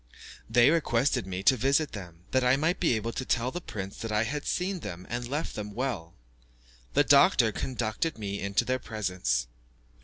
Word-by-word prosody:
They 120 +4 +5
requested 135 - +1
me 95 0 -4
to 125 +5 +6
visit 135 +5 +1
them, 90 -5 -9
that 130 -1 +2
I 125 +1 +5
might 160 +5 0
be 160 -9 +2
able 110 +1 -2
to 130 - -4
tell 125 0 0
the 175 - -5
prince 100 - -6
that 115 - -5
I 105 +1 +2
had 145 +6 -4
seen 185 +1 -1
them 90 - -7
and 120 0 -3
left 145 +5 -3
them 105 -1 -6
well. 115 -11 -3 0.8
The - - +6
doctor - - +5
conducted 125 +4 -2
me 100 -2 -4
into 100 +1 0
their 130 0 0
presence. 90 - -1
115 Hz, 185 wpm, -28 LUFS, 100-135 Hz, 0.8 s, to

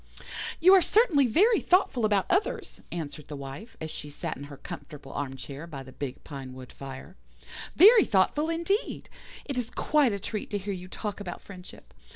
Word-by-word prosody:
"'You 370 +3 +7
are 385 - +8
certainly 335 - +4
very 410 - +4
thoughtful 355 - +3
about 205 -3 +2
others,' 380 +4 -1
answered 150 -3 -6
the 150 - -6
Wife, 140 - -9
as 160 -1 -5
she 150 - -6
sat 145 - -4
in 140 - -8
her 145 -1 -10
comfortable 140 -1 -9
armchair 140 +2 -5
by 140 -5 -7
the 130 - -12
big 135 -1 -6
pinewood 130 -3 -9
fire; 135 +6 -9 0.6
'very 425 +5 +8
thoughtful 255 - +2
indeed. 340 +7 -1 0.4
It 275 -3 -4
is 240 -1 -3
quite 290 -3 +2
a 200 - -1
treat 205 +2 -5
to 205 - -1
hear 200 0 -4
you 180 -1 -7
talk 210 +2 -5
about 180 -4 -6
friendship. 185 -2 -12
190 Hz, 180 wpm, -28 LUFS, -, 0.6 s, are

